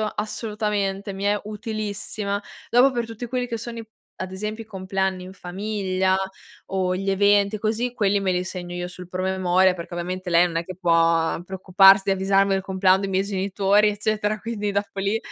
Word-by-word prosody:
Assolutamente. 210 -2 -2
Mi 195 +1 -6
è 205 0 +2
utilissima. 210 -1 -4 0.3
Dopo 250 +3 +5
per 240 -2 -2
tutti 225 +1 -7
quelli 250 +1 -2
che 230 - -3
sono 230 +1 -7
i 225 - -9 0.3
ad 185 0 -5
esempio 215 +3 -5
i - - -31
compleanni 190 -2 -2
in 185 - -9
famiglia 190 0 -1 0.5
o 185 -1 -1
gli 195 +2 -2
eventi 200 +1 +3
così, 225 +3 -1
quelli 205 -4 +2
me 190 -2 0
li 180 0 0
segno 180 -1 -6
io 175 0 -4
sul 180 0 -10
promemoria 185 0 +2
perché 175 0 -8
ovviamente 180 +2 -4
lei 170 +1 +5
non 170 -2 -2
è 165 - -2
che 185 - -7
può 165 -2 +2
preoccuparsi 190 +1 +5
di - - +4
avvisarmi 195 +1 +2
del 195 0 +1
compleanno 190 0 +3
dei 195 - -2
miei 190 0 +1
genitori, 200 +1 +2
eccetera, 210 0 0
quindi 210 -1 -3
dopo 200 0 -2
lì 200 +3 +1
195 Hz, 185 wpm, -23 LUFS, 185-210 Hz, 0.5 s, Dopo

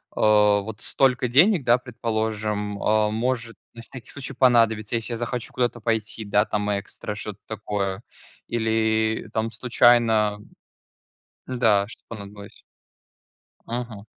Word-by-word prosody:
э, - - -6
вот 105 0 +3
столько 130 -2 +2
денег, 160 - +5
да, 120 0 +4
предположим, 110 -3 -3
э, 105 0 +2
может 115 0 -2 0.2
на 115 - -10
всякий 120 0 -10
случай 140 -1 -7
понадобиться, 115 -4 +3
если 115 +1 -2
я 115 - -3
захочу 120 0 -4
куда-то 120 -1 -1
пойти, 110 0 -2
да, 105 0 +2
там, 105 -1 -2
экстра, 105 +1 -7
что-то 105 -1 -6
такое, 100 -2 -3 0.4
или, 110 -1 0
там, 110 0 -1
случайно. 115 -3 +3 1.1
Да, 110 -6 +2
что-то - - -11
понадобилось. 100 -2 -10 1.1
Мгм. 115 -3 -5
110 Hz, 125 wpm, -24 LUFS, 105-120 Hz, 1.1 s, денег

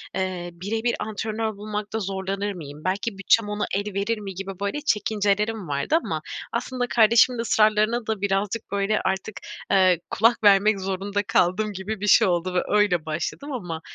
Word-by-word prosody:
eee, 185 -2 -2
bire 200 +6 -4
bir 240 - +1
antrenör 220 0 -3
bulmakta 210 +1 -4
zorlanır 195 +1 -3
mıyım, 150 -4 -9
belki 195 +3 -2
bütçem 205 +2 +3
ona 210 0 -1
el 205 +1 -2
verir 200 +4 -1
mi 200 -2 -7
gibi 195 +1 -5
böyle 200 +9 -2
çekincelerim 210 - 0
vardı 145 - 0
ama - - -3 0.3
aslında 250 -1 -2
kardeşimin 235 +1 +4
ısrarlarına 215 +1 +2
da 220 -3 -2
birazcık 200 +2 -1
böyle 200 +2 0
artık, 190 +3 -3 0.3
eee, 185 -3 +4
kulak 230 +1 +2
vermek 200 0 +5
zorunda 195 +2 -2
kaldım 205 +3 +1
gibi 200 +3 -5
bir 205 - -1
şey 220 +1 +6
oldu 180 0 0
ve 180 - +2
öyle 205 -6 +2
başladım. 160 - -4
Ama, 175 -9 -5
205 Hz, 165 wpm, -24 LUFS, 190-220 Hz, 0.3 s, şey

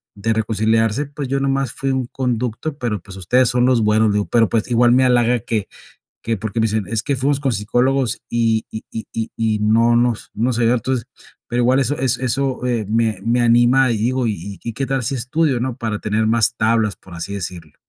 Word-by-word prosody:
de 110 +3 -1
reconciliarse, 110 +4 +1
pues, 140 -1 -6
yo 135 +1 0
nomás 135 -2 0
fui 135 - -2
un 130 -2 -1
conducto, 125 +3 -3
pero, 115 -6 -2
pues, 95 +1 -11
ustedes 125 +7 +2
son 125 0 +2
los 125 -3 +3
buenos", 110 +1 +3
le - - 0
digo, 105 - +1
"pero, 115 -2 +3
pues, 115 0 -1
igual 120 +1 +4
me 130 +1 +4
halaga 120 -1 +3
que 110 -2 -3 0.6
que 115 0 -1
porque 110 +3 -4
me - - +2
dicen: 110 -2 -1
'Es 110 +1 -1
que 140 - -1
fuimos 135 +2 +1
con 135 -4 0
psicólogos 120 +4 0
y 115 -1 +1
y 110 - -6
y 110 - -6
y 115 0 -3
y 110 -2 0
no 115 +3 +3
nos 120 -2 0
no 120 +4 0
se 115 0 +1
vio'". 115 - +4
Entonces, 125 0 -2 0.4
pero 120 +1 0
igual 130 +3 +3
eso 135 +2 0
eso 130 -1 0
eso, 130 0 -1
eh, 115 -4 -1
me 110 -3 0
me 120 +1 +2
anima 120 +2 +4
y 110 - -1
digo: 125 +3 0
"Y 110 - +1
y 95 +3 -9
y 115 - -3
qué 135 +3 -2
tal 135 -1 -1
si 135 +4 -1
estudio", 130 +2 0
¿no?, 125 0 -2
"para 110 -4 -3
tener 110 +1 0
más 115 0 +2
tablas", 110 -2 +1
por 90 -2 -14
así 90 +4 -5
decirlo. 85 -5 -7
115 Hz, 230 wpm, -19 LUFS, 110-130 Hz, 0.6 s, igual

